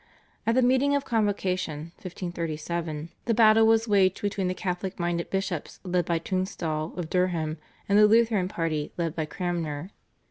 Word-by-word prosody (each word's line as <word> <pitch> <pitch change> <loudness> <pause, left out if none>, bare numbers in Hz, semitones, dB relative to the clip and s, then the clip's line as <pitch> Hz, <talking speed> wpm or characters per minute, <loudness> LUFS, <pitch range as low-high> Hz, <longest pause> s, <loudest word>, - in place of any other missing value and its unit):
At 230 - +3
the 255 - +4
meeting 260 +3 +3
of 280 -1 -1
Convocation 185 - -1
(1537) 170 -3 -4 0.2
the 230 - +1
battle 220 0 +6
was 225 +1 +4
waged 195 -3 +3
between 200 -2 0
the 185 - -1
Catholic 185 +1 -3
minded 170 0 -1
bishops 190 -5 -3
let 180 -2 0
by 170 - +2
Tunstall 165 -3 -2
of 175 -3 -3
Durham 165 -3 0 0.3
and 200 +1 +4
the 210 - +8
Lutheran 220 -4 +3
party 165 -5 -2
let 165 -2 -1
by 160 - -1
Cranmer. 170 0 -3
180 Hz, 155 wpm, -27 LUFS, 165-205 Hz, 0.3 s, the